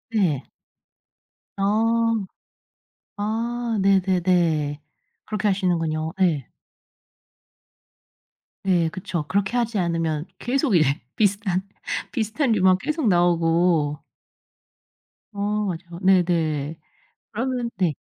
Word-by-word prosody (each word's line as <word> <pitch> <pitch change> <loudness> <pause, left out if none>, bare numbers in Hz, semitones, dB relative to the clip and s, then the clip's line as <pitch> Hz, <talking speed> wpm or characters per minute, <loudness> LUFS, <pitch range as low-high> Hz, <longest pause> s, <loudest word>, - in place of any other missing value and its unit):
예. 165 - +1 1.1
어. 225 +1 +2 0.9
아. 230 +2 -2
네네네. 180 -6 +2 0.5
그렇게 215 -1 -1
하시는군요. 165 -5 0
예. 155 -9 +2 2.2
예. 175 -4 +3
그쵸. 170 -2 -4
그렇게 200 +3 0
하지 235 -2 0
않으면 165 -3 -1
계속 260 -2 +1
이제 145 -4 +3 0.2
비슷한 200 -3 +1 0.5
비슷한 235 +3 0
류만 190 -3 +4
계속 305 - -1
나오고. 170 -4 +2 1.3
어. 200 - -8 0.3
맞아요. 170 0 -7
네네. 165 -5 +2 0.5
그러면 245 +1 -2
네. 180 -4 +1
185 Hz, 175 characters per minute, -23 LUFS, 165-220 Hz, 2.2 s, 류만